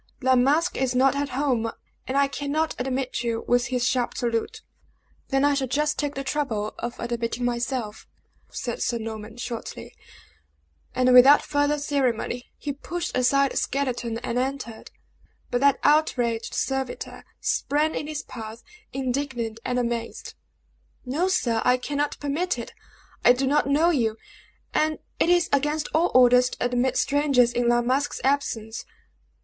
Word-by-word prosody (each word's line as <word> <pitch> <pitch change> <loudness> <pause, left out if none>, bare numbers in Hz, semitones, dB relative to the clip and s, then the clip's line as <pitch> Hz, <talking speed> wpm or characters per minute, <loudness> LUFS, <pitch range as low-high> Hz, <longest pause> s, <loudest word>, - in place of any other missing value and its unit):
"La 260 -1 +3
Masque 290 +8 +2
is 260 -1 0
not 265 +2 +4
at 285 0 -1
home, 250 -4 0 0.4
and 265 - -1
I 280 0 +4
cannot 290 +3 -1
admit 255 0 -2
you," 230 -1 -2
was 245 0 +2
his 250 -1 0
sharp 250 -2 0
salute. 240 - -2 0.6
"Then 270 +1 +2
I 290 - +4
shall 275 -2 0
just 295 +4 0
take 290 -1 -2
the 275 - -3
trouble 255 -7 -2
of 235 0 -5
admitting 235 0 -2
myself," 240 -2 -3 0.4
said 240 - -5
Sir 240 - 0
Norman, 220 0 -7
shortly. 240 -1 -6 1.0
And 255 0 +4
without 265 +4 +8
further 290 0 +1
ceremony, 255 -4 -1
he 285 - -4
pushed 340 +5 -5
aside 275 +2 +3
the - - -4
skeleton 245 -4 -1
and 240 - -1
entered. 260 -3 -4 0.6
But 245 - 0
that 280 -1 +5
outraged 245 -7 +2
servitor 265 -1 -3 0.2
sprang 300 +2 0
in 295 - -3
his 305 -1 -4
path, 225 -1 -9 0.3
indignant 255 -4 -3
and 250 - -1
amazed. 235 -1 -3 0.7
"No, 300 +9 0
sir; 245 -12 +1
I 250 0 +4
cannot 290 +3 -2
permit 310 +6 -1
it. - - -7 0.5
I 245 - +7
do 260 +2 -1
not 285 +1 +2
know 315 +5 +4
you; 225 -8 0 0.6
and 310 0 +1 0.2
it - - +3
is 350 -1 +4
against 295 +2 +1
all 325 +3 +2
orders 250 0 +6
to - - -3
admit 245 +1 +1
strangers 275 -4 +3
in 240 0 +1
La 240 0 +3
Masque's 265 +4 0
absence." 235 -5 -1
260 Hz, 155 wpm, -25 LUFS, 240-285 Hz, 1.0 s, without